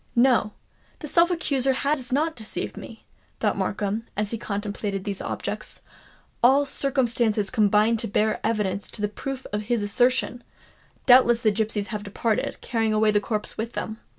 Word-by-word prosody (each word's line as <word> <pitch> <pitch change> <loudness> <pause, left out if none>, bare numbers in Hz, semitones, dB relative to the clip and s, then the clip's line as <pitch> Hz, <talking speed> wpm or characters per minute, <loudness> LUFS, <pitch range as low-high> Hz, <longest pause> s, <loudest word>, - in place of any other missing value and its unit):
"No—that 245 +4 0
self 340 +4 +4
accuser 275 -7 +1
has 275 -1 -1
not 315 +5 +1
deceived 220 -2 -4
me!" - - -11 0.3
thought - - +1
Markham, 210 +2 -2
as 210 0 -1
he 230 - -2
contemplated 205 -2 -3
these 200 -1 -4
objects. - - -5 0.6
"All 270 +4 +5
circumstances 240 -7 0
combine 215 0 +3
to 225 - -2
bear 215 +2 +1
evidence 205 -3 -1
to - - -8
the - - +3
truth 265 +5 -6
of 210 - 0
his 235 -3 +1
assertion! 245 +3 +1 0.6
Doubtless 245 -2 +6
the 215 - +4
gipsies 210 -1 -2
have 210 -2 -4
departed, 210 +2 -1
carrying 225 -2 0
away 215 0 +3
the 205 0 +2
corpse 210 0 -4
with 230 +2 -3
them!" 220 0 -4
225 Hz, 155 wpm, -25 LUFS, 210-255 Hz, 0.6 s, Doubtless